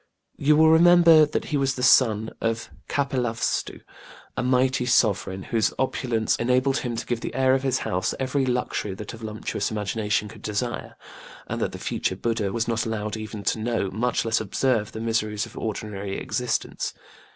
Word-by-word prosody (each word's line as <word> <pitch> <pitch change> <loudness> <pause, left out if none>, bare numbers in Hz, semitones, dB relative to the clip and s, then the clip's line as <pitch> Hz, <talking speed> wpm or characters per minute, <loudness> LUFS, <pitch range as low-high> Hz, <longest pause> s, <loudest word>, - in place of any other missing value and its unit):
You 150 +2 +3
will 160 0 +6
remember 165 -2 +7
that 150 - -2
he 150 - -1
was 135 -1 +1
the 125 - -4
son 110 -4 +4
of 115 0 0
the - - -9 0.3
king 135 -2 0
of 115 -1 -2
KapilavastĖĢu - - -2 0.5
a - - -1
mighty 125 0 +2
sovereign 95 -5 +2
whose 110 -3 +1
opulence 120 -4 0
enabled 130 +3 +2
him 120 -2 -3
to 115 - -4
give 120 -2 -2
the - - -5
heir 130 0 +3
of 135 - +2
his 130 -2 +1
house 90 +1 -1
every 135 +1 0
luxury 125 -6 -1
that 105 +2 -7
a - - -8
voluptuous 110 -2 -3
imagination 105 0 -1
could 105 - -12
desire: 110 +3 -3 0.5
and - - -4
that - - 0
the - - -7
future 95 - -2
BudĖĢdĖĢha 110 0 -1
was 115 +1 -1
not 115 -1 0
allowed 105 -1 -3
even 110 -1 -6
to 110 - 0
know, 110 -4 -1
much 115 +5 0
less 110 -1 +1
observe, 110 +1 0
the 110 - -7
miseries 110 -2 -1
of - - -14
ordinary 100 -2 -4
existence. 125 -1 -2
115 Hz, 185 wpm, -25 LUFS, 105-130 Hz, 0.5 s, remember